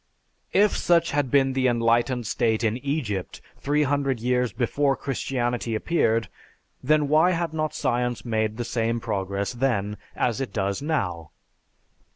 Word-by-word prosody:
If 205 +1 +4
such 170 -1 +2
had 145 -2 0
been 135 0 +3
the 130 -1 +2
enlightened 120 +1 +1
state 110 +1 0
in 110 +1 +1
Egypt 130 - -3 0.2
three 150 +2 +1
hundred 140 -3 0
years 125 0 +1
before 135 +5 +1
Christianity 120 -4 -2
appeared, 115 - +1 0.5
then 150 +2 +2
why 160 +5 +4
had 170 -2 -2
not 155 -1 -2
science 120 -2 -1
made 110 -2 -1
the 120 - -3
same 115 0 -1
progress 100 -2 -2
then 105 -5 -1 0.2
as 120 +1 0
it 135 - -3
does 100 0 -1
now? 90 - -2
125 Hz, 145 wpm, -25 LUFS, 110-140 Hz, 0.5 s, If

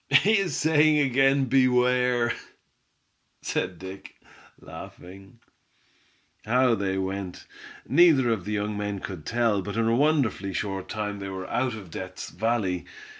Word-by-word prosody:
"He 195 +10 +5
is 195 -3 -1
saying 155 -1 +4
again 135 0 +3
beware!" 125 -1 +2 1.1
said 90 - -2
Dick, 95 +2 -10 0.4
laughing. 95 +5 -12 1.1
How 125 +2 +3
they 95 -3 -1
went, 95 -1 -4 0.4
neither 140 -5 +5
of 105 -6 -2
the 105 - -3
young 105 0 -2
men 105 -1 -3
could 90 -5 -8
tell, 115 -4 +1
but 100 +3 -6
in 115 0 +1
a 115 - +3
wonderfully 130 -9 +1
short 95 -1 -4
time 105 -1 -4
they 100 0 -5
were 95 -1 -6
out 130 -3 -1
of 95 -6 -11
Death's 95 +1 -7
Valley. 100 -3 -1
110 Hz, 135 wpm, -26 LUFS, 95-130 Hz, 1.1 s, He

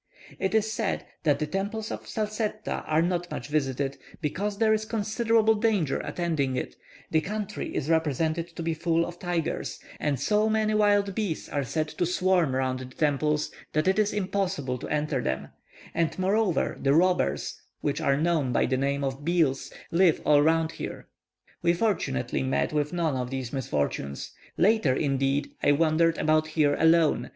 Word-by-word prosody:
It 190 +3 0
is 220 0 +2
said - - -2 0.2
that 150 -3 +2
the 155 - -1
temples 205 +5 -3
at - - -6
Salsetta 215 0 -3
are 155 +1 +3
not 175 0 -1
much 125 - -6
visited, 140 -2 -1 0.2
because 200 +6 -2
there 220 0 +4
is 215 0 0
considerable 220 +1 +2
danger 210 -9 +1
attending 155 -7 -1
it; 125 - -4 0.4
the 160 - +3
country 210 +2 -4
is 145 - -1
represented 160 +1 +1
to 170 - -4
be 165 0 0
full 165 +1 +1
of 175 0 -8
tigers, 175 -3 -2 0.2
and 145 -4 0
so 210 +9 +2
many 215 0 +1
wild 205 -2 +3
bees 195 -6 -2
are 145 - -1
said 155 +5 -1
to 175 - -1
swarm 180 -6 +2
round 130 -1 0
the 130 - -6
temples 150 +3 0 0.2
that 155 +3 +1
it 190 +3 +3
is 210 -1 +2
impossible 185 -10 -1
to - - -6
enter 150 -3 0
them; 65 0 -2 0.4
and 165 -1 0
moreover 190 -2 +1
the 140 +1 +3
robbers, 165 - +1 0.2
which 145 +2 -1
are 140 -3 +2
known 155 -4 +1
by - - +2
the 130 +1 0
name 140 +1 0
of 135 +1 -3
bheels, 160 -5 +1 0.2
live 170 -1 +4
all 145 -1 +6
round 160 +1 +2
here. - - -7 0.5
We 170 0 +3
fortunately 170 - 0
met 70 +2 0
with 150 -1 0
none 165 -5 0
of 125 -1 -2
these 130 -2 -4
misfortunes. 70 - -2 0.3
Later, 185 - +3
indeed, 135 0 0
I 145 - +4
wandered 165 +2 +3
about 155 0 +2
here 155 -2 +2
alone. 165 -1 +4
160 Hz, 170 wpm, -27 LUFS, 140-195 Hz, 0.5 s, all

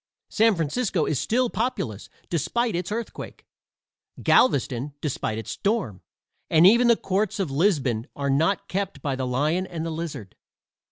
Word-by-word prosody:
San 220 -1 +4
Francisco 170 - 0
is 145 - 0
still 250 +3 +1
populous, 120 - -3 0.2
despite 225 - -1
its 180 +3 -3
earthquake, 230 +2 -6 0.8
Galveston 140 - +2
despite 125 -7 -2
its 110 - -5
storm, 200 - -1 0.5
and 160 +2 +5
even 235 +5 +6
the 235 - +6
courts 195 +2 -1
of 180 -8 -1
Lisbon 135 - +1
are 140 -1 -1
not 165 +8 +1
kept 190 -7 -3
by 140 -2 -1
the 130 -1 -3
lion 155 +9 0
and 165 -3 -5
the 165 - -3
lizard. 155 - -6
165 Hz, 150 wpm, -25 LUFS, 135-205 Hz, 0.8 s, even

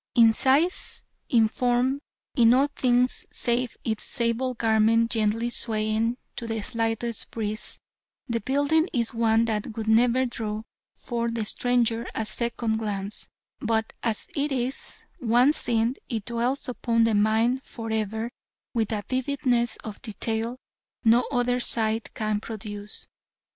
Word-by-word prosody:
In 230 -2 +7
size, 285 +10 +1 0.3
in 225 -3 +5
form, 250 +4 +1 0.4
in 240 -2 +6
all 275 +3 +3
things 250 0 +2
save 240 0 0
its 220 -2 -1
sable 240 +2 0
garment 225 0 +3
gently 225 +1 +1
swaying 220 +1 0 0.2
to 235 - -4
the 225 -1 -2
slightest 230 0 +1
breeze, 215 -1 -2 0.5
the 235 -2 -1
building 285 - +2
is 235 -2 0
one 225 0 +3
that 215 0 -3
would 220 -1 -3
never 240 +3 +4
draw 220 -3 -4 0.3
from 235 -2 -3
the 225 -2 -1
stranger 235 0 +1
a 220 - -1
second 230 +1 0
glance, 205 -2 -4 0.3
but 220 -1 -1
as 225 -3 -1
it 290 +1 0
is, 260 0 -3 0.2
once 250 +4 +4
seen 230 0 +2 0.2
it 220 -4 -3
dwells 240 +4 -1
upon 235 -2 +1
the 225 -1 +3
mind 220 +5 +2
for 225 -3 -7
ever 220 +2 -2 0.4
with 225 -3 0
a 210 -2 -2
vividness 255 -2 0
of 215 -2 -8
detail 225 +1 -2 0.5
no 235 +1 +5
other 245 -1 +1
sight 225 -2 +1
can 215 -1 -1
produce. 210 -1 -7
230 Hz, 140 wpm, -26 LUFS, 220-245 Hz, 0.5 s, In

